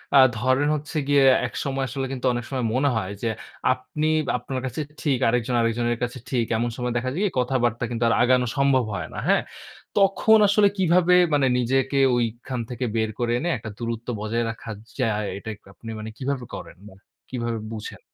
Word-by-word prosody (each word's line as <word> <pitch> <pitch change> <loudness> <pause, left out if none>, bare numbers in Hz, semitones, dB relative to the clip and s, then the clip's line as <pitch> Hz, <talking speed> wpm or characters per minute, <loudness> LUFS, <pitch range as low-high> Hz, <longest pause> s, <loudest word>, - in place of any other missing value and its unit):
আ - - +9 0.2
ধরেন 130 +5 +2
হচ্ছে 150 +2 -5
গিয়ে 140 -1 +5 0.2
একসময় 135 +1 -3
আসলে 135 +1 -3
কিন্তু 130 -1 -4
অনেক 120 0 -2
সময় 130 -3 -2
মনে 140 +2 +3
হয়, 95 -2 -3
যে 115 - +1 0.4
আপনি 150 +4 -3 0.3
আপনার 130 +2 -4
কাছে 130 +5 -3 0.2
ঠিক, 140 -5 +1
আরেকজন 125 +1 +1
আরেকজনের 120 +1 0
কাছে 125 +1 -3
ঠিক, 120 -3 +1
এমন 120 +1 0
সময় 125 -1 -2
দেখা 130 +2 -1
যায় 180 - -2
কি 200 - 0
কথাবার্তা 125 -2 0
কিন্তু 120 -1 -2
আর - - +3
আগানো 125 0 +3
সম্ভব 135 -2 +3
হয় 90 -5 -4
না। - - -8
হ্যাঁ? - - +4 0.6
তখন 200 +3 +5
আসলে 205 0 +5
কিভাবে 180 0 +4 0.2
মানে 140 -2 +3
নিজেকে 135 +3 +1 0.2
ওইখান 120 +2 -2
থেকে 125 +1 -3
বের 110 -1 +1
করে 120 -1 0
এনে 175 +5 -1
একটা 110 0 -7
দূরত্ব 115 0 -4
বজায় 115 +2 -1
রাখা 115 0 -8 0.3
যায়, 105 -4 0
এটা 110 - -7
এক 105 - -29
আপনি 115 - -11
মানে 110 +1 -6
কীভাবে 130 -1 -3
করেন? - - -9
মানে 95 0 -18 0.3
কিভাবে 120 -2 -2 0.2
বুঝেন? 105 -1 -7
125 Hz, 190 wpm, -24 LUFS, 115-135 Hz, 0.6 s, আ